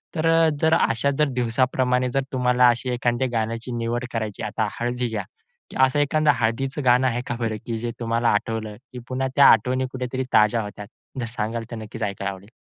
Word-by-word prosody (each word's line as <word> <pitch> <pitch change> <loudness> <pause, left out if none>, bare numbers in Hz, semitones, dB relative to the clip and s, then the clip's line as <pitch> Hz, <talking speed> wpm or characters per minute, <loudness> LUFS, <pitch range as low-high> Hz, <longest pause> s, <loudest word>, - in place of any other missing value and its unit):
तर 155 - -1
अ, 165 0 +5
जर 160 0 +3
अशा 130 0 +1
जर 150 - +5
दिवसाप्रमाणे 125 +1 +1
जर 135 - +2
तुम्हाला 125 -1 +3
अशी 120 +2 -1
एखाद्या 120 +1 0
गाण्याची 115 +2 -2
निवड 120 +2 -2
करायची, 110 -3 -3
आता 110 0 -1
हळदी 120 +1 -1
घ्या, 110 - -3 0.6
असं 130 +3 0
एखादं 150 +1 +3
हळदीचं 135 +5 -1
गाणं 125 +1 +4
आहे 120 0 -1
का 120 - -2
बरं 110 -2 -2
की 115 -1 -3
जे 120 +1 -3
तुम्हाला 115 0 +1
आठवलं; 110 0 -1 0.2
की 125 - -7
पुन्हा 130 +1 -1
त्या 140 - +7
आठवणी 125 +4 +2
कुठेतरी 130 0 -3
ताज्या 110 +1 +4
होतात? 105 0 -8 0.3
जर 120 - -2
सांगाल 115 +1 -2
तर - - -4
नक्कीच 110 +1 -7
ऐकायला 100 -1 -2
आवडेल. 95 +2 -12
120 Hz, 190 wpm, -23 LUFS, 115-130 Hz, 0.6 s, त्या